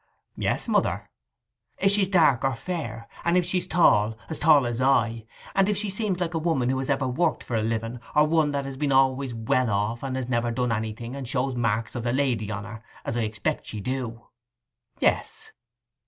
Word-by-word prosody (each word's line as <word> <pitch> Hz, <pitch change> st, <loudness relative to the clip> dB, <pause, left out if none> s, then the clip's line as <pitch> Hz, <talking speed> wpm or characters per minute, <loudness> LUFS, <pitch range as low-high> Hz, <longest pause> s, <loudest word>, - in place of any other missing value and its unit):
'Yes, -, -, -1 dB
mother.' -, -, 0 dB, 0.7 s
'If 195 Hz, -, +3 dB
she's 200 Hz, -1 st, +3 dB
dark 160 Hz, -10 st, +4 dB
or 135 Hz, -2 st, +1 dB
fair, 115 Hz, -7 st, -5 dB, 0.2 s
and 170 Hz, +1 st, +3 dB
if 180 Hz, -, +2 dB
she's 180 Hz, 0 st, -1 dB
tall—as 110 Hz, -2 st, +2 dB
tall 150 Hz, -4 st, +5 dB
as 120 Hz, +1 st, -2 dB
I. 115 Hz, -4 st, +2 dB, 0.3 s
And 195 Hz, +1 st, +3 dB
if 205 Hz, -, +1 dB
she 205 Hz, -1 st, -1 dB
seems 200 Hz, -3 st, -1 dB
like 175 Hz, -1 st, -2 dB
a 165 Hz, -, 0 dB
woman 155 Hz, -7 st, +1 dB
who 130 Hz, 0 st, 0 dB
has 135 Hz, -, -3 dB
ever 135 Hz, -1 st, +1 dB
worked 155 Hz, +6 st, 0 dB
for -, -, -7 dB
a 110 Hz, -, +1 dB
living, 115 Hz, +2 st, -2 dB, 0.2 s
or 150 Hz, 0 st, +6 dB
one 155 Hz, -1 st, +2 dB
that 140 Hz, -1 st, -2 dB
has 135 Hz, -1 st, -6 dB
been 145 Hz, 0 st, 0 dB
always 135 Hz, -1 st, +2 dB
well 115 Hz, +2 st, +1 dB
off, 105 Hz, +3 st, -1 dB
and 135 Hz, -1 st, -3 dB
has 130 Hz, -2 st, -3 dB
never 120 Hz, -1 st, 0 dB
done 125 Hz, +1 st, -1 dB
anything, 110 Hz, +3 st, -3 dB
and 135 Hz, -3 st, -6 dB
shows 130 Hz, +1 st, 0 dB
marks 115 Hz, -2 st, -1 dB
of 120 Hz, -, -4 dB
the 120 Hz, 0 st, 0 dB
lady 125 Hz, -6 st, 0 dB
on 105 Hz, -1 st, -4 dB
her, 110 Hz, +1 st, -9 dB, 0.2 s
as -, -, -2 dB
I 120 Hz, -, 0 dB
expect 105 Hz, -1 st, -2 dB
she 110 Hz, -, -5 dB
do.' 120 Hz, 0 st, -4 dB, 0.8 s
'Yes. -, -, 0 dB
130 Hz, 205 wpm, -25 LUFS, 115-150 Hz, 0.8 s, or